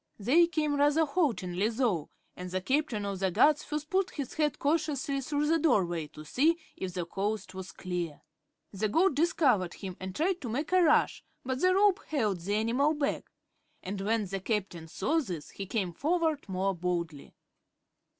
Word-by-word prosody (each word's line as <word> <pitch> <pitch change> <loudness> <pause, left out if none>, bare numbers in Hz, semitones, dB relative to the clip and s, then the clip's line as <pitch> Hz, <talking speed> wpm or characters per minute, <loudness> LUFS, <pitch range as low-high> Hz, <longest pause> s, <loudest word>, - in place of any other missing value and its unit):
They 285 +12 +4
came 305 -3 0
rather 295 +3 +4
haltingly, 220 - 0
though, 225 - 0 0.3
and 180 0 -7
the 185 +1 -1
Captain 260 -1 0
of 200 -2 -3
the 190 0 +1
Guards 280 - +4
first 300 0 -5
put 380 0 +2
his 280 -4 -5
head 300 -3 0
cautiously 285 -2 0
through 290 +2 -1
the 325 +2 +3
doorway 175 - +1
to 155 +1 -12
see 305 - +2 0.2
if 185 -1 -5
the 175 -2 -2
coast 200 +2 -3
was 190 0 -7
clear. 175 -4 -4 0.5
The 210 +2 -1
goat 340 - +3
discovered 270 - +2
him 190 -3 -7
and 185 0 -6
tried 360 +3 0
to 245 - -5
make 290 +9 -2
a 370 0 +5
rush, 315 -3 +3 0.2
but 260 0 -2
the 370 0 +4
rope 400 -1 +4
held 215 - 0
the 200 +4 -1
animal 250 +8 +2
back 290 -1 -2 0.5
and 195 +1 -4
when 215 +1 +1
the 195 +1 -4
Captain 190 -5 -3
saw 255 - 0
this 180 - -5
he 195 - -7
came 190 -5 -1
forward 315 - 0
more 190 +1 0
boldly. 170 -4 -3
230 Hz, 180 wpm, -30 LUFS, 185-305 Hz, 0.5 s, a